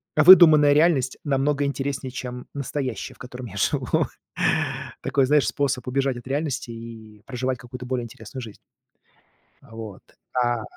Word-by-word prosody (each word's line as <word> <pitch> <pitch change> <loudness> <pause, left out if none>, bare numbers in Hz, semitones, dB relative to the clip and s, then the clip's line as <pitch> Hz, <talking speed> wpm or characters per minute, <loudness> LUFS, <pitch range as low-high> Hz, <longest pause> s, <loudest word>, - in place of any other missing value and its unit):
выдуманная 155 -3 +8
реальность 150 -5 +2
намного 145 0 +1
интереснее, 140 -1 -3
чем 125 0 -6
настоящая, 140 -3 -4
в - - -24
котором 125 -1 -8
я 100 -2 -9
живу. 100 - +1 1.0
Такой, 135 -2 +1
знаешь, 145 -3 +3
способ 125 0 -1
убежать 135 0 0
от 120 - -11
реальности 140 -2 -2
и 110 -2 -11
проживать 130 0 -2
какую-то 125 +1 -9
более 125 -1 -2
интересную 130 +2 -9
жизнь. 110 -3 -10 1.1
Вот. 110 -3 -9 0.3
А 120 -2 0
130 Hz, 135 wpm, -24 LUFS, 120-140 Hz, 1.1 s, выдуманная